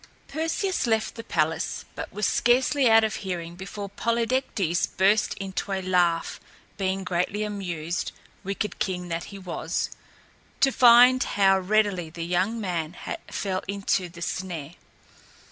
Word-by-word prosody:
Perseus 325 Hz, +2 st, -1 dB
left 220 Hz, -1 st, +1 dB
the 230 Hz, -, -8 dB
palace, 160 Hz, -3 st, -1 dB
but -, -, -6 dB
was 210 Hz, +1 st, -2 dB
scarcely 255 Hz, +4 st, +3 dB
out 225 Hz, 0 st, +7 dB
of 220 Hz, 0 st, 0 dB
hearing 175 Hz, -3 st, -5 dB
before 200 Hz, +2 st, -6 dB
Polydectes 230 Hz, -4 st, 0 dB
burst 205 Hz, +3 st, +2 dB
into 195 Hz, +1 st, -4 dB
a 190 Hz, -1 st, -1 dB
laugh, 175 Hz, -2 st, +1 dB, 0.4 s
being 190 Hz, -1 st, -1 dB
greatly 180 Hz, +3 st, -1 dB
amused, 175 Hz, -5 st, -3 dB, 0.3 s
wicked 200 Hz, +2 st, -3 dB
king 180 Hz, -2 st, -2 dB
that 165 Hz, 0 st, -3 dB
he 200 Hz, -, -9 dB
was, 185 Hz, -3 st, -3 dB, 0.7 s
to 270 Hz, -, +4 dB
find 250 Hz, +1 st, +7 dB
how 195 Hz, -1 st, +3 dB
readily 190 Hz, -3 st, +1 dB
the 165 Hz, +1 st, -6 dB
young 185 Hz, +6 st, 0 dB
man 175 Hz, -4 st, -3 dB, 0.3 s
fell 190 Hz, -2 st, -2 dB
into 195 Hz, -2 st, 0 dB
the 170 Hz, 0 st, -8 dB
snare. 170 Hz, -5 st, -4 dB
195 Hz, 135 wpm, -26 LUFS, 175-220 Hz, 0.7 s, out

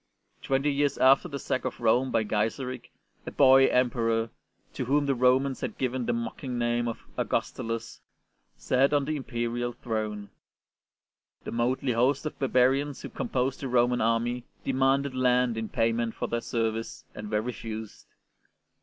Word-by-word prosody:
Twenty 135 Hz, +2 st, +1 dB
years 140 Hz, 0 st, +1 dB
after 135 Hz, +1 st, +5 dB
the 140 Hz, -, -5 dB
sack 130 Hz, -2 st, -2 dB
of -, -, -4 dB
Rome 120 Hz, +3 st, +3 dB
by 110 Hz, -, +1 dB
Gaiseric, 115 Hz, +4 st, -2 dB, 0.4 s
a -, -, -1 dB
boy 135 Hz, -1 st, +6 dB
Emperor, 115 Hz, -3 st, +1 dB, 0.4 s
to 130 Hz, -, -3 dB
whom 145 Hz, +3 st, +2 dB
the 140 Hz, -, +2 dB
Romans 130 Hz, +2 st, +2 dB
had -, -, -4 dB
given 130 Hz, -1 st, -2 dB
the -, -, +2 dB
mocking 120 Hz, +2 st, -4 dB
name 120 Hz, 0 st, 0 dB
of 115 Hz, -, -5 dB
'* -, -, -28 dB
Augustulus,'' 115 Hz, 0 st, -3 dB, 0.6 s
sat 135 Hz, +3 st, +2 dB
on 145 Hz, -1 st, +2 dB
the 155 Hz, +2 st, -2 dB
imperial 120 Hz, -2 st, -3 dB
throne. 110 Hz, -3 st, -4 dB, 1.1 s
The -, -, -6 dB
motley 125 Hz, +3 st, 0 dB
host 130 Hz, +6 st, +2 dB
of 155 Hz, -, -5 dB
barbarians 135 Hz, +2 st, +2 dB
who -, -, -6 dB
composed 130 Hz, +1 st, -2 dB
the 135 Hz, -, -4 dB
Roman 125 Hz, 0 st, +2 dB
Army 115 Hz, +2 st, 0 dB, 0.2 s
demanded 135 Hz, +1 st, +2 dB
land 125 Hz, -2 st, +2 dB
in 110 Hz, -1 st, -4 dB
payment 115 Hz, 0 st, 0 dB
for -, -, -3 dB
their 120 Hz, 0 st, -2 dB
service, 115 Hz, -1 st, -3 dB
and 105 Hz, 0 st, -7 dB
were 105 Hz, -1 st, +1 dB
refused. 110 Hz, -3 st, -7 dB
125 Hz, 155 wpm, -28 LUFS, 115-135 Hz, 1.1 s, boy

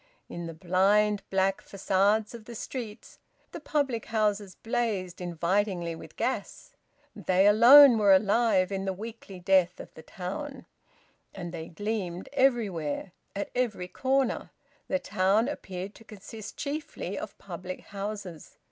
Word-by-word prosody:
In 170 Hz, -1 st, -6 dB
the 165 Hz, -, -6 dB
blind, 200 Hz, +4 st, +2 dB
black 190 Hz, 0 st, +1 dB
facades 200 Hz, +3 st, +1 dB
of 230 Hz, -2 st, -10 dB
the 235 Hz, -, -9 dB
streets 225 Hz, -2 st, -7 dB, 0.3 s
the -, -, -7 dB
public 280 Hz, -7 st, -1 dB
houses 210 Hz, -3 st, 0 dB
blazed 220 Hz, -7 st, -2 dB
invitingly 175 Hz, +1 st, -1 dB
with 165 Hz, -, -11 dB
gas; -, -, -3 dB, 0.4 s
they 185 Hz, +1 st, +2 dB
alone 240 Hz, +4 st, +9 dB
were 205 Hz, -2 st, +5 dB
alive 200 Hz, -1 st, +3 dB
in 195 Hz, 0 st, -2 dB
the 190 Hz, -, -1 dB
weekly 210 Hz, -1 st, -9 dB
death 180 Hz, -1 st, +3 dB
of -, -, -10 dB
the 160 Hz, -, -11 dB
town; 255 Hz, -, -6 dB, 0.7 s
and 175 Hz, -3 st, -6 dB
they 160 Hz, -1 st, -6 dB
gleamed 190 Hz, -1 st, -4 dB
everywhere, 205 Hz, -, 0 dB, 0.2 s
at 200 Hz, -, -4 dB
every 220 Hz, -8 st, -1 dB
corner; 265 Hz, +5 st, 0 dB, 0.4 s
the 280 Hz, -, +1 dB
town 205 Hz, -1 st, +1 dB
appeared 195 Hz, -8 st, -6 dB
to 225 Hz, -, -16 dB
consist 215 Hz, 0 st, -10 dB
chiefly 295 Hz, +1 st, -4 dB
of -, -, -7 dB
public 185 Hz, 0 st, -7 dB
houses. 200 Hz, -5 st, -7 dB
200 Hz, 135 wpm, -28 LUFS, 185-230 Hz, 0.7 s, alone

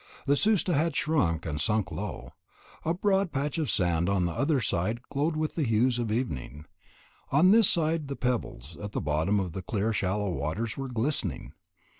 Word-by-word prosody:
The 140 Hz, -, +3 dB
Susta 200 Hz, 0 st, +2 dB
had 155 Hz, +1 st, +1 dB
shrunk 85 Hz, -, +1 dB
and 75 Hz, -2 st, -2 dB
sunk 105 Hz, -3 st, +1 dB
low; 105 Hz, 0 st, -5 dB, 0.5 s
a 160 Hz, -, 0 dB
broad 195 Hz, 0 st, +1 dB
patch 145 Hz, +3 st, -2 dB
of 150 Hz, -6 st, -1 dB
sand 85 Hz, -2 st, +1 dB
on 95 Hz, -3 st, +2 dB
the 85 Hz, -, -1 dB
other 140 Hz, -, +1 dB
side 110 Hz, +3 st, -1 dB
glowed 150 Hz, +3 st, 0 dB
with 155 Hz, 0 st, -1 dB
the 165 Hz, -, -2 dB
hues 120 Hz, 0 st, +2 dB
of 115 Hz, -3 st, -2 dB
evening; 75 Hz, -, -3 dB, 0.7 s
on 165 Hz, +7 st, +5 dB
this 220 Hz, -2 st, +6 dB
side 160 Hz, -2 st, +1 dB
the 140 Hz, -, -4 dB
pebbles 110 Hz, -, -3 dB
at 105 Hz, -1 st, -6 dB
the -, -, -1 dB
bottom 80 Hz, +8 st, +1 dB
of 95 Hz, -3 st, -2 dB
the 95 Hz, -, -5 dB
clear 105 Hz, +3 st, -1 dB
shallow 100 Hz, 0 st, -1 dB
waters 85 Hz, +10 st, -3 dB
were 135 Hz, -1 st, -5 dB
glistening. 115 Hz, -, -2 dB
115 Hz, 185 wpm, -28 LUFS, 90-150 Hz, 0.7 s, this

